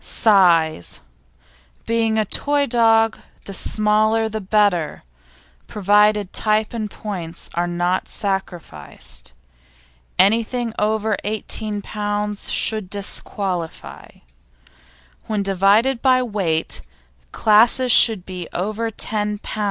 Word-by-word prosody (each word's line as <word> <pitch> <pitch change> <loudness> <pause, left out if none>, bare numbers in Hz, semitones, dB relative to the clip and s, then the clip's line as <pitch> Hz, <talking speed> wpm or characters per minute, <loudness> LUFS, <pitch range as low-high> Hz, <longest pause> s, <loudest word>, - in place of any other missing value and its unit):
SIZE 170 - +2 0.9
Being 225 -1 0
a 215 - +1
toy 285 +7 0
dog 225 -2 +2 0.3
the 200 - -8
smaller 215 +2 +2
the 220 0 -5
better, 195 -5 0 0.6
provided 210 0 +2
type 215 0 +2
and 215 -3 -4
points 180 -6 -6
are 175 +1 -1
not 175 +1 -1
sacrificed. 175 - -4 0.8
Anything 230 +4 +1
over 215 0 0
18 210 0 -2
lb. 210 0 -3
should 215 -4 0
disqualify. 195 -3 -4 1.2
When 210 -2 -1
divided 200 +6 +2
by 255 -1 +3
weight, 190 -9 -1 0.5
classes 230 +4 +3
should 220 -5 +5
be 180 -2 -7
over 215 +5 -2
10 210 -1 -2
lb. 215 - -8
210 Hz, 95 wpm, -20 LUFS, 190-220 Hz, 1.2 s, should